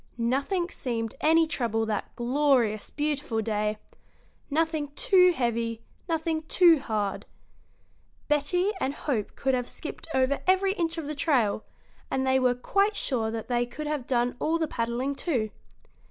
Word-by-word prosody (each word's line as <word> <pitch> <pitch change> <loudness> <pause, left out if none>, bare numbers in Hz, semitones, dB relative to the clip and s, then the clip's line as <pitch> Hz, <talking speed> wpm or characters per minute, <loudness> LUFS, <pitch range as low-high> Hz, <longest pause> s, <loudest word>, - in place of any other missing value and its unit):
Nothing 280 +10 0
seemed 230 -4 -3
any 325 +1 +5
trouble 230 -8 -1
that 215 -2 -3
glorious, 240 -4 +1
beautiful 290 -5 -2
day 210 -1 -1 0.7
nothing 315 0 0
too 365 +1 +5
heavy, 230 -5 -1 0.3
nothing 320 -1 0
too 340 -4 +6
hard. 210 -6 -2 1.0
Betty 300 +7 +1
and 275 +2 -1
Hope 235 -9 -2
could 265 -1 0
have 250 -1 -1
skipped 320 - -7
over 265 +2 +2
every 380 +1 +3
inch 335 -4 -2
of 325 - -3
the 300 - -3
trail, 255 -9 +1 0.5
and 265 0 0
they 260 0 +3
were 250 -1 +3
quite 400 - +1
sure 230 - -1
that 225 0 -5
they 245 -1 0
could 305 +5 -7
have 295 -4 -3
done 245 -1 +1
all 325 +2 +1
the 320 -1 -1
paddling, 240 +2 -2
too. 250 - -1
265 Hz, 150 wpm, -27 LUFS, 235-320 Hz, 1.0 s, too